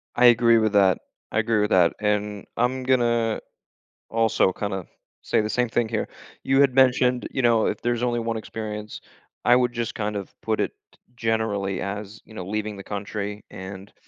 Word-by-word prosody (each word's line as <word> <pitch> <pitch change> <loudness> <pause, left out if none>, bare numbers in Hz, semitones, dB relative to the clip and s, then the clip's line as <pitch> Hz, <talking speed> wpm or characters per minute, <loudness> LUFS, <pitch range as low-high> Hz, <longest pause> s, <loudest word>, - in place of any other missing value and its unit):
I 125 - +5
agree 115 -1 +6
with 110 -1 +1
that, 95 -3 +4 0.3
I 110 - +1
agree 110 -1 +1
with 105 - 0
that. 90 -2 +5
And 105 -1 -1
I'm 130 +2 0
gonna 120 -3 +2 0.7
also 115 -4 +2
kinda 95 -2 -4 0.3
say - - +1
the 105 - -3
same 125 +2 0
thing 115 0 +1
here. 110 -1 -2 0.4
You 135 +1 +2
had 135 -3 +4
mentioned, 125 -1 +3
you 135 - -1
know, 115 -3 +3
if - - -2
there's 120 0 0
only 120 -1 +1
one 115 0 -2
experience, 105 -1 -6 0.5
I 120 - +6
would 125 -1 +2
just 120 -2 -3
kind 105 -1 -2
of 100 - -7
put - - -1
it - - 0 0.4
generally 110 -4 -1
as, 100 +2 -5
you 110 - -15
know, 90 -5 -6
leaving 105 +1 -3
the 100 - -9
country 105 0 -5
and 95 +1 -9
110 Hz, 185 wpm, -24 LUFS, 105-120 Hz, 0.7 s, agree